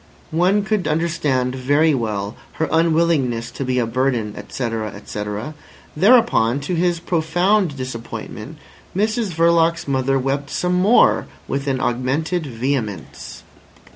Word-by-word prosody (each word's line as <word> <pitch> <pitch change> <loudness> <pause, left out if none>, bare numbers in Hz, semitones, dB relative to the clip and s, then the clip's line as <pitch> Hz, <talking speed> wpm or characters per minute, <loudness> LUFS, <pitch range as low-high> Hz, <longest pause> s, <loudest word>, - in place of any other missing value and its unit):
One 185 +6 +2
could 210 -5 -1
understand 150 -5 0
very 145 +5 +2
well 105 -4 -2 0.2
her 160 - -1
unwillingness 160 -8 +1
to - - -5
be 130 -1 -1
a 120 - +2
burden, 115 -3 -1
etc. 110 +1 -4
etc. 105 +5 -5 0.4
Thereupon, 190 - +4
to 150 +6 -3
his 175 0 +1
profound 175 +1 +1
disappointment, 120 +1 -7 0.4
Mrs 215 0 0
Verloc's 170 0 +3
mother 135 0 +1
wept 135 +2 -2
some 180 +4 -1
more 195 +7 +4 0.2
with 140 +1 -3
an 135 -1 0
augmented 140 +8 -1
vehemence. 120 -4 -4
140 Hz, 120 wpm, -20 LUFS, 125-170 Hz, 0.4 s, Thereupon